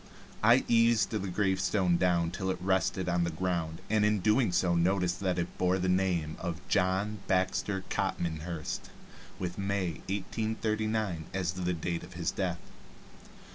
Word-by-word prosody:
I 120 Hz, +4 st, +6 dB
eased 115 Hz, -3 st, +4 dB
the 110 Hz, -, -1 dB
gravestone 95 Hz, -1 st, +1 dB
down 85 Hz, -2 st, +2 dB
till 95 Hz, +1 st, -3 dB
it 95 Hz, -, 0 dB
rested 95 Hz, 0 st, 0 dB
on 90 Hz, -1 st, +2 dB
the 85 Hz, -, 0 dB
ground, 85 Hz, -1 st, -2 dB
and 110 Hz, 0 st, +2 dB
in 105 Hz, 0 st, +3 dB
doing 105 Hz, +2 st, +3 dB
so 90 Hz, 0 st, +2 dB
noticed 90 Hz, +1 st, +1 dB
that 95 Hz, -2 st, 0 dB
it 85 Hz, 0 st, -3 dB
bore 90 Hz, 0 st, +3 dB
the 95 Hz, 0 st, -1 dB
name 90 Hz, -4 st, +1 dB
of 85 Hz, -2 st, -5 dB
"John 100 Hz, +2 st, +1 dB
Baxter 95 Hz, +1 st, 0 dB
Copmanhurst," 80 Hz, -1 st, -3 dB, 0.5 s
with 90 Hz, 0 st, -4 dB
"May, 95 Hz, -4 st, -1 dB
1839," 110 Hz, -2 st, -1 dB
as 90 Hz, -3 st, 0 dB
the 90 Hz, -1 st, -1 dB
date 85 Hz, +1 st, -2 dB
of 90 Hz, -, -11 dB
his 85 Hz, -1 st, -1 dB
death. 90 Hz, -3 st, -3 dB
95 Hz, 150 wpm, -30 LUFS, 85-100 Hz, 0.5 s, I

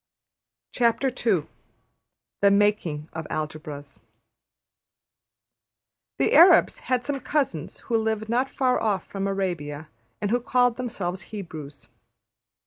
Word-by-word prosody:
\chapter{The 225 Hz, -, -1 dB
Making 200 Hz, -7 st, +1 dB
of 160 Hz, -1 st, -5 dB
Algebras} 150 Hz, -2 st, -6 dB, 2.2 s
The 135 Hz, -, +1 dB
Arabs 345 Hz, +5 st, +7 dB
had 250 Hz, -1 st, +1 dB
some 285 Hz, -1 st, -2 dB
cousins 260 Hz, -, -2 dB
who 230 Hz, -, 0 dB
lived 220 Hz, -1 st, -1 dB
not 250 Hz, +4 st, +1 dB
far 255 Hz, -2 st, +1 dB
off 205 Hz, -4 st, 0 dB
from 195 Hz, 0 st, -3 dB
Arabia 165 Hz, -6 st, -3 dB, 0.3 s
and 205 Hz, 0 st, -2 dB
who 245 Hz, -, +3 dB
called 245 Hz, 0 st, +2 dB
themselves 195 Hz, -7 st, -4 dB
Hebrews. 155 Hz, -, -8 dB
200 Hz, 100 wpm, -25 LUFS, 155-245 Hz, 2.2 s, Arabs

